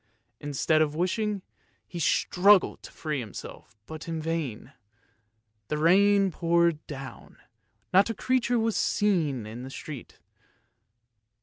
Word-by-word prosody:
Instead 145 +2 +1
of 150 -1 +1
wishing, 195 +3 -1 0.4
he 175 - -7
struggled 190 +5 +3
to - - -11
free 150 -3 -3
himself, 110 -1 -9
but 160 +5 -9
in 165 -1 -3
vain. 155 -8 -4 0.9
The 150 - -2
rain 195 +4 +4
poured 170 -1 +1
down, 135 -2 -9 0.6
not 195 +4 +5
a 225 - -2
creature 245 +1 +1
was 225 -1 +1
to - - -1
be - - +2 0.3
seen 145 - -1
in 110 +3 -8
the 130 - -7
street. 140 -2 -9
165 Hz, 130 wpm, -27 LUFS, 145-195 Hz, 0.9 s, not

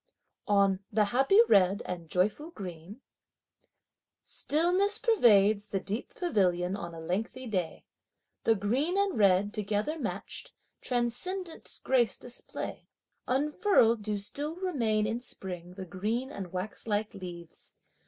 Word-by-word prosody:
On 200 -2 +3
"the 215 0 +3
happy 270 - +4
red 195 +1 +4
and 170 -3 -6
joyful 210 - 0
green:" 190 - -9 1.2
Stillness 360 +7 +1
pervades 215 - +4
the 195 - -1
deep 205 +5 -5
pavilion 185 - +1
on 170 -4 -6
a - - -8
lengthy 215 +10 -3
day. 185 -8 -3 0.6
The 225 - +4
green 255 - 0
and 400 -2 +1
red, 200 0 +3
together 210 +9 -1
matched, - - -5 0.3
transcendent 320 +9 -2
grace 245 -5 +2
display. 245 -1 -5 0.4
Unfurled 270 - +3
do 210 0 -2
still 290 +10 -4
remain 240 - 0
in 225 +3 -2
spring 180 -6 -6
the 190 -1 -6
green 215 +9 -2
and 190 -9 -7
waxlike 210 +3 -3
leaves. 175 -4 -9
215 Hz, 120 wpm, -30 LUFS, 190-270 Hz, 1.2 s, happy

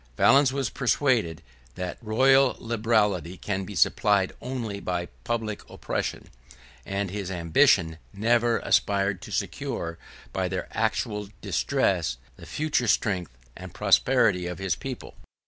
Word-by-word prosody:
Valens 135 -1 +5
was 135 -3 -2
persuaded, 125 - +1 0.3
that 90 -1 -5
royal 130 +4 +4
liberality 105 -6 0
can 95 0 -3
be 100 - -8
supplied 100 +4 +2
only 120 -5 -4
by 90 -2 -2 0.2
public 110 - -2
oppression, - - -4 0.6
and 100 -1 -2
his 100 -2 -4
ambition 85 - +3
never 115 +3 +2
aspired 100 -2 +1
to - - -10
secure, 85 0 -3 0.3
by 95 -1 0
their 90 0 -4
actual 110 -2 -1
distress, - - 0 0.2
the - - -13
future 150 -5 0
strength 90 - 0 0.2
and - - -10
prosperity 90 -1 +3
of 90 -1 -5
his 95 -3 -1
people. 130 +4 -7
105 Hz, 125 wpm, -26 LUFS, 90-120 Hz, 0.6 s, Valens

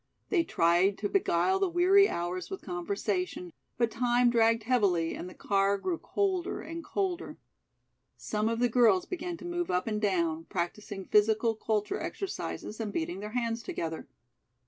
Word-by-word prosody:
They 360 -5 +3
tried 175 - +2
to 205 - -2
beguile 380 - +2
the 390 -1 +1
weary 375 +4 +5
hours 175 +1 -3
with 385 - -6
conversation, 180 -1 -3 0.2
but 235 -2 +1
time 245 0 +3
dragged 230 -1 +3
heavily 200 -9 +2
and 180 - -6
the - - -13
car 200 0 +1
grew 335 - -2
colder 380 -3 -1
and 330 +1 -7
colder. 370 -1 -3 0.8
Some 215 +1 -1
of 230 - -1
the 245 +1 +3
girls 225 -6 +4
began 350 -1 -4
to - - -10
move 350 0 -2
up 180 0 +1
and 215 -1 -2
down, 170 -5 0
practicing 195 +3 -4
physical 220 +2 +3
culture 220 - -1
exercises 365 - -5
and 215 -2 -3
beating 175 +1 -3
their 210 +2 -7
hands 230 -2 -1
together. 160 -7 -5
220 Hz, 160 wpm, -30 LUFS, -, 0.8 s, weary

